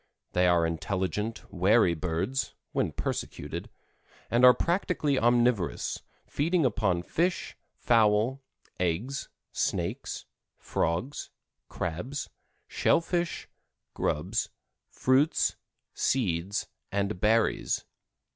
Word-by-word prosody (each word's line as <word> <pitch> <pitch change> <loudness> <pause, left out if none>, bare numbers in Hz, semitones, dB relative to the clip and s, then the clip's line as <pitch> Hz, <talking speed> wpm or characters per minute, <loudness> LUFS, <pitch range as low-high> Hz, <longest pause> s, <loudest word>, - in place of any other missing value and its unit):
They 90 0 +4
are 85 -1 +4
intelligent, 95 +7 -2
wary 95 +1 +4
birds 85 +11 -2 0.2
(when - - 0
persecuted), - - -4 0.6
and 120 +2 +3
are 125 0 +10
practically 170 -6 +1
omnivorous, 120 - +2 0.2
feeding 165 +2 +1
upon 95 -7 +1
fish, 175 - -1 0.2
fowl, 115 +3 +3 0.4
eggs, 95 +11 -1 0.2
snakes, - - -2 0.3
frogs, 125 - -2 0.4
crabs, 100 - -4 0.4
shell - - +3
fish, 175 0 -2 0.5
grubs, - - -1 0.4
fruits, 135 +5 +2 0.4
seeds 95 -6 0 0.2
and 100 -1 -1
berries. 110 +2 +2
110 Hz, 85 wpm, -29 LUFS, 90-135 Hz, 0.6 s, are